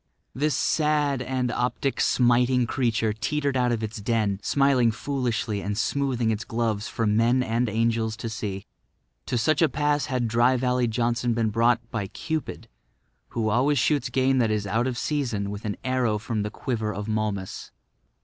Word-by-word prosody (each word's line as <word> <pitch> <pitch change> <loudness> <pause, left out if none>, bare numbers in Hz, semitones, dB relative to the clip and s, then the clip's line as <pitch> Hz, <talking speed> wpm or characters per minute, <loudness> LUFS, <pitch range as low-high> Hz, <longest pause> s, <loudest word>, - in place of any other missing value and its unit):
This 145 +4 0
sad 150 -4 +1
and 130 -1 -1
optic 125 +3 -1
smiting 125 0 +3
creature 115 -3 0
teetered 140 +5 -1
out 125 -1 +2
of 115 -2 -1
its 110 0 -5
den, 105 -3 0
smiling 135 -4 +3
foolishly 115 -4 -2
and 100 +1 -3
smoothing 125 -2 0
its 110 0 -2
gloves 115 -2 -2
for 115 - -2
men 115 +4 +3
and 115 0 0
angels 110 0 0
to 115 - -5
see. 105 -3 -4 0.6
To 125 - 0
such 150 +7 +2
a 160 - +5
pass 145 0 0
had 125 -4 -1
Dry 120 +3 +3
Valley 125 0 +1
Johnson 120 +1 0
been 115 -2 +1
brought 115 +1 +2
by 100 -4 -2
Cupid, 160 - -5 0.6
who 110 -2 -1
always 135 +6 +2
shoots 145 +3 +1
game 130 0 +2
that 115 -3 +2
is 105 -1 -1
out 115 +5 0
of 125 -2 -3
season 120 -11 -1
with 105 +2 -7
an 105 - -3
arrow 125 -4 +1
from 110 0 -3
the 105 - -2
quiver 110 -2 -3
of 105 +1 -5
Momus. 105 -3 -3
120 Hz, 170 wpm, -25 LUFS, 110-130 Hz, 0.6 s, a